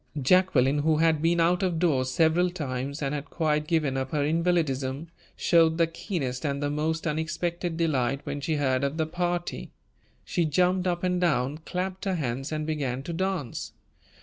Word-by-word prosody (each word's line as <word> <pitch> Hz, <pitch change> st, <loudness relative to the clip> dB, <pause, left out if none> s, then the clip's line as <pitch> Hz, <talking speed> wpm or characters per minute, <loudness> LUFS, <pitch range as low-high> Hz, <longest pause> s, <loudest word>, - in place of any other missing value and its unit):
Jacqueline, 145 Hz, -3 st, +3 dB
who 155 Hz, +1 st, +2 dB
had 160 Hz, -1 st, +3 dB
been 170 Hz, +1 st, +2 dB
out 175 Hz, +2 st, +3 dB
of 180 Hz, -3 st, 0 dB
doors 140 Hz, -7 st, +1 dB
several 165 Hz, +6 st, +3 dB
times 140 Hz, -3 st, -4 dB
and 135 Hz, +1 st, -1 dB
had 145 Hz, -1 st, -3 dB
quite 150 Hz, -2 st, 0 dB
given 155 Hz, -5 st, +1 dB
up 130 Hz, 0 st, -2 dB
her 150 Hz, -1 st, 0 dB
invalidism, 155 Hz, -3 st, 0 dB, 0.3 s
showed 165 Hz, -1 st, +3 dB
the 170 Hz, -, +4 dB
keenest 160 Hz, -, -4 dB
and 140 Hz, -2 st, -1 dB
the 145 Hz, 0 st, -1 dB
most 160 Hz, +2 st, -1 dB
unexpected 165 Hz, +2 st, -2 dB
delight 140 Hz, -5 st, 0 dB
when 145 Hz, -, -4 dB
she 155 Hz, +2 st, -1 dB
heard 130 Hz, -2 st, +1 dB
of 140 Hz, +3 st, -1 dB
the 160 Hz, -, +1 dB
party. 175 Hz, +1 st, -3 dB, 0.6 s
She 175 Hz, -, 0 dB
jumped 180 Hz, +4 st, +2 dB
up 175 Hz, 0 st, -1 dB
and 180 Hz, -1 st, +1 dB
down, 150 Hz, -3 st, +1 dB
clapped 185 Hz, +1 st, -3 dB
her 190 Hz, -1 st, 0 dB
hands, 135 Hz, -2 st, -3 dB
and 155 Hz, 0 st, -2 dB
began 135 Hz, -5 st, -2 dB
to 170 Hz, -, -5 dB
dance. 185 Hz, -7 st, -3 dB
160 Hz, 175 wpm, -27 LUFS, 140-175 Hz, 0.6 s, the